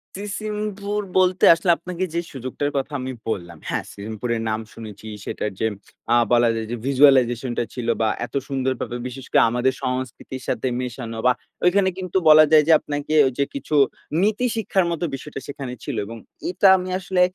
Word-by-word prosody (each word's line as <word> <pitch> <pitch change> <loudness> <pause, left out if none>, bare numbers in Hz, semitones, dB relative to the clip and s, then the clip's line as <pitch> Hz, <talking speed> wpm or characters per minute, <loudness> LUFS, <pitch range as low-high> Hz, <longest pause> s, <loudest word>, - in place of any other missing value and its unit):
'সিসিমপুর' 210 0 -3 0.2
বলতে 185 0 +3
আসলে 170 +2 +2
আপনাকে 175 +3 -5
যে 170 - 0
সুযোগটার 135 +2 -3
কথা 135 +2 -2
আমি 130 +1 -4 0.2
বললাম, 85 -6 -4
হ্যাঁ - - -1
'সিসিমপুরের' 110 +3 -4
নাম 110 0 -1
শুনেছি 110 -2 -10 0.2
সেটার 105 - -3
যে 110 - +2 0.4
অ্যা 120 - +5 0.2
বলা 120 -1 +5
যায় 110 -1 -3
যে - - -1
ভিজুয়ালাইজেশন 130 -3 +4
টা - - +2
ছিল 120 -2 -5
বা 110 - +3 0.2
এত - - -13
সুন্দরভাবে 130 -3 -2
বিশেষ 130 +1 -8
করে - - +5
আমাদের 125 +3 +1
সংস্কৃতির 130 0 -4
সাথে 120 - -1
মেশানো 120 -2 -5
বা 125 - +6 0.3
ঐখানে 190 +1 +4
কিন্তু 185 -1 -2
বলা 155 0 +9
যায় 155 -1 +7
যে - - +5
আপনাকে 145 +1 -4
ঐ - - +4
যে 140 - +3
কিছু 275 - -3 0.5
নীতি 215 +5 +1
শিক্ষার 195 -4 +1
মত 170 - -3
বিষয়টা 135 +1 -7
সেখানে 140 -3 -6
ছিল 145 - -4
এবং 115 +3 -8 0.3
এটা 185 +2 +3
আমি 185 0 -5
আসলে 185 -1 0
135 Hz, 175 wpm, -22 LUFS, 120-180 Hz, 0.5 s, বলা